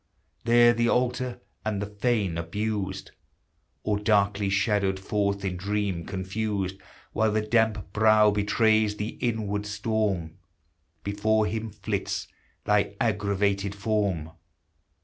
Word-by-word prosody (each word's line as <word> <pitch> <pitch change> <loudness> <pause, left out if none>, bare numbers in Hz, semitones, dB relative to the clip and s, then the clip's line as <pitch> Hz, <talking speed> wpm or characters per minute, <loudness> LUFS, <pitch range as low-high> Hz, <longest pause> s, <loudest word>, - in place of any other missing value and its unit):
there 120 0 +6
the 120 0 +1
altar 125 0 0 0.2
and 110 -2 -1
the 100 - -2
fane 105 -3 0
abused! 95 +3 -3 0.7
Or 105 -1 0
darkly 100 -1 +2
shadowed 100 -1 +1
forth 100 0 -1
in 90 -2 -2
dream 100 -3 -2
confused, 95 0 -2 0.4
While 110 -1 +2
the 110 0 +1
damp 110 -3 +1
brow 110 -1 +5
betrays 105 +1 +2
the 105 +1 -2
inward 105 -4 -1
storm, 100 -6 -1 0.6
Before 110 +2 +1
him 110 +1 -3
flits 100 -1 -3 0.4
thy 105 -1 +2
aggravated 100 -2 0
form 100 -6 -1
105 Hz, 110 wpm, -26 LUFS, 100-110 Hz, 0.7 s, there